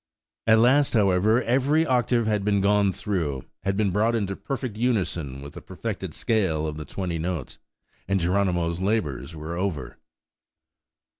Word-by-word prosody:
At 110 0 +6
last, 130 +4 +4
however, 105 +3 +3
every 135 +6 +2
octave 120 -3 +2
had 105 -2 0
been 100 0 +2
gone 100 0 +3
through, 80 -10 -3 0.2
had 95 0 -1
been 105 -3 +2
brought 110 +5 +2
into 100 -3 -1
perfect 120 +2 -4
unison 90 - -1
with 70 - -9
the - - -9
perfected - - -5
scale 95 -9 0
of 75 -1 -4
the 75 - -6
twenty 90 -2 -3
notes, 85 0 -4 0.5
and 95 0 +1
Geronimo's 90 -1 0
labours 85 -7 -1
were 80 +2 -5
over! 85 -7 -3
100 Hz, 150 wpm, -25 LUFS, 85-110 Hz, 0.5 s, At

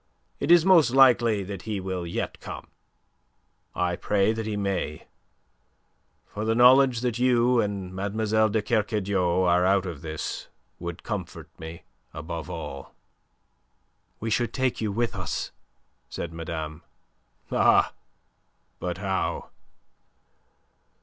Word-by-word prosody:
It - - -2
is 170 -1 +7
most 180 -7 +6
likely 120 -5 +5
that 95 -1 -6
he 105 +2 -3
will 95 -2 -4
yet 85 - -4
come. - - -8 1.1
I 90 -1 0
pray 105 +3 +1
that 110 -1 -4
he 105 -1 -2
may; 95 -6 -2 1.2
for 105 - -6
the 110 +1 +1
knowledge 125 0 +6
that 120 -2 -1
you 125 -1 +3
and 100 -3 -4
Mlle. 110 +3 +1
de 105 0 0
Kercadiou 100 -5 +1
are 90 +1 +4
out 95 +1 +3
of 85 -6 -6
this 80 -1 -5 0.3
would 85 -1 -6
comfort - - -5
me 80 +1 -8 0.3
above 80 +1 -6
all." 70 -1 -7 1.2
"We 115 +1 -3
should 120 +2 0
take 130 -3 0
you 110 -2 -1
with 115 +3 -1
us," 90 -4 -3 0.6
said 85 -1 -5
madame. 80 -1 -5 0.7
"Ah! - - +4 0.9
But 90 -1 -3
how?" 95 -1 -2
100 Hz, 125 wpm, -26 LUFS, 90-115 Hz, 1.2 s, is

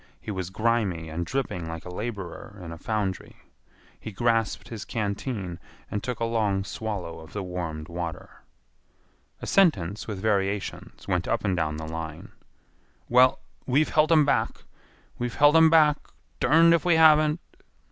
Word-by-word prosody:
He 110 - -6
was 95 -3 -4
grimy 100 -6 0
and 85 +2 -4
dripping 105 -11 -3
like 80 -1 -7
a 90 - -7
laborer 100 -1 -6
in 85 - -7
a 85 - -7
foundry. 105 -3 -3 0.6
He 110 - -7
grasped 115 +1 0
his 110 -2 -6
canteen 100 -4 -3 0.3
and 105 - -2
took 125 -2 -4
a 115 - 0
long 105 -4 0
swallow 100 -5 -5
of 80 - -13
the 100 - -3
warmed 85 -4 -5
water. 85 -1 -6 1.0
A - - -2
sentence 100 - +2
with 105 -4 -4
variations 100 -1 -2
went - - 0
up - - -1
and 95 - +1
down 75 -3 -1
the 80 - -5
line. 80 -1 -6 0.8
"Well, 125 +1 +5 0.3
we've 140 +4 +2
helt 155 +1 +3
'em 155 -3 +6
back. 140 - 0 0.6
We've 120 -1 -3
helt 145 +2 +5
'em 160 0 +7
back; 155 -2 +5 0.4
derned 165 +2 +5
if 170 - +2
we 175 -2 +4
haven't." 155 0 +5
105 Hz, 155 wpm, -26 LUFS, 90-130 Hz, 1.0 s, em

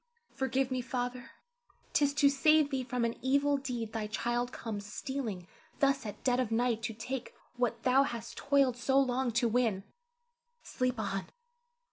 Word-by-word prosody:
Forgive 265 0 0
me, 255 -1 0
Father; 245 0 -3 0.6
'tis 285 -1 +3
to 295 -1 +5
save 300 +1 +4
thee 265 -1 0
from 250 -1 -1
an 230 - -2
evil 280 +2 +2
deed 245 -5 -4
thy 220 -2 -2
child 240 +3 -1
comes 215 -5 -5
stealing 225 -10 -4 0.3
thus 275 -4 +2
at 210 0 -8
dead 250 -1 +2
of 250 -4 0
night 230 0 +1
to 225 - -3
take 245 +3 -5 0.2
what 240 -2 -1
thou 260 +1 +5
hast 235 -4 -3
toiled 275 -3 +2
so 265 +2 +3
long 260 -1 +1
to 235 +1 +2
win. 225 -4 +1 0.8
Sleep 255 -2 -1
on! 195 -2 -2
250 Hz, 160 wpm, -32 LUFS, 230-270 Hz, 0.8 s, to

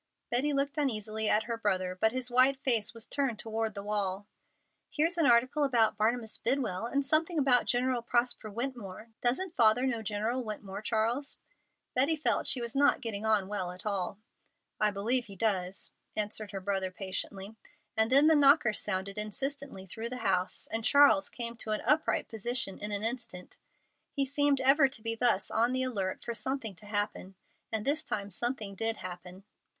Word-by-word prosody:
Betty 265 +5 +1
looked 280 +2 0
uneasily 220 -5 0
at 215 - +3
her 230 +1 -3
brother, 185 -4 0
but 220 +4 +2
his 255 0 -3
white 255 +2 +5
face 235 -5 +2
was 230 -1 -6
turned 270 -5 -1
toward 220 -1 -3
the 200 - -5
wall. 205 -1 -2 0.6
"Here's 330 +3 +1
an 320 - +4
article 255 +5 +4
about 235 -6 +3
Barnabas 220 +1 0
Bidwell, 230 -5 -1
and 280 +3 0
something 320 +4 +2
about 265 -4 +3
General 250 0 +1
Prosper 240 -1 0
Wetmore. 230 -2 -6
Doesn't 325 +9 -1
father 230 +2 +4
know 235 -4 -1
General 220 +4 -2
Wetmore, 210 -3 -6
Charles?" 230 +6 -1 0.6
Betty 275 +6 +3
felt 305 - 0
she 255 - +1
was 235 +1 -3
not 285 0 +4
getting 220 -3 -3
on 210 -3 +2
well 195 -3 -3
at 180 +3 -11
all. 195 -2 -2 0.6
"I 215 - +3
believe 230 +5 0
he 200 - -11
does," 190 -3 -1 0.2
answered 210 0 -2
her 195 - -5
brother 190 -1 -1
patiently, 195 +2 -4 0.4
and 220 +2 +2
then 280 +3 +6
the 320 - +6
knocker 280 -5 +5
sounded 200 0 -3
insistently 265 0 -4
through 225 +5 -6
the 250 - -5
house, 185 -5 0
and 225 0 -2
Charles 285 +3 +5
came 235 -1 -5
to 220 - -6
an 215 - -1
upright 310 +1 +2
position 225 -2 -2
in 210 0 -5
an 205 0 -2
instant. 225 -6 -4 0.5
He 275 - -1
seemed 285 0 +2
ever 275 +2 +6
to 260 -4 -6
be 225 0 0
thus 230 -3 +1
on 235 +3 +2
the 260 0 0
alert 200 -7 -3
for 235 - -2
something 230 -1 -3
to 210 - -13
happen. 205 -2 -3 0.4
And 220 -2 -2
this 305 +3 +1
time 205 -7 -4
something 220 0 -2
did 225 +3 -1
happen. 180 +1 -9
225 Hz, 180 wpm, -30 LUFS, 205-260 Hz, 0.6 s, then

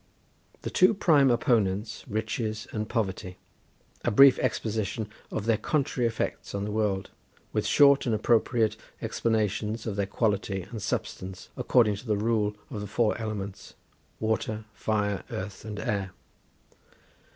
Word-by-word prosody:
The - - -3
two 185 +4 +5
prime 150 -8 +5
opponents 110 -4 +1
Riches 110 -1 -2
and 110 -1 -3
Poverty. 95 -4 -2 0.7
A - - +2
brief 135 +4 +7
exposition 110 -2 -1 0.2
of 110 - -3
their 115 -2 +2
contrary 130 -2 0
effects 115 -2 -3
on 100 - -2
the 105 - -3
world; 105 -3 -1 0.4
with - - 0
short 140 -2 +5
and 115 - +2
appropriate 115 +1 +2 0.2
explanations 110 0 -1
of 105 -3 -3
their 100 -1 0
quality 100 -3 0
and 110 +3 -8
substance, 95 0 -4
according 110 -5 +3
to 120 - -11
the 105 -2 +1
rule 105 -1 +1 0.2
of 105 -5 -4
the 105 - -5
four 110 +2 +1
elements, 105 -3 -5 0.4
Water, 110 0 -1
Fire, 105 -1 -1
Earth, 95 0 -6
and 105 -2 -5
Air. 100 -5 -2
110 Hz, 140 wpm, -28 LUFS, 100-115 Hz, 0.7 s, brief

